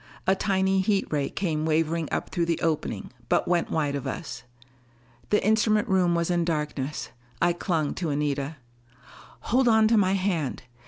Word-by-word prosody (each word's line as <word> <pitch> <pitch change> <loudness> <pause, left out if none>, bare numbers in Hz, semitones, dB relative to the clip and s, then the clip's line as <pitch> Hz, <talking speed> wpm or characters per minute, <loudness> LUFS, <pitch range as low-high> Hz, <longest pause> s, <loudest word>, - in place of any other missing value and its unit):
A 190 - +4
tiny 190 -1 +1
heat 195 0 +1
ray 145 -2 0
came 160 -5 -2
wavering 160 0 0
up - - -2
through 170 -2 0
the 170 - 0
opening, 155 -11 -2 0.2
but - - +2
went 175 -1 +1
wide 150 -3 0
of 140 -2 -3
us. 175 - -5 0.9
The 210 - +2
instrument 215 +1 +3
room 185 -3 +3
was 170 +1 0
in 175 -1 +2
darkness. 150 -3 -3 0.3
I 175 0 +3
clung 165 -4 -1
to 170 - -1
Anita. 145 0 -1 0.9
"Hold 250 +3 +2
on 220 -1 +5
to 230 - +4
my 190 -2 +3
hand. 180 -10 -1
170 Hz, 165 wpm, -26 LUFS, 155-195 Hz, 0.9 s, on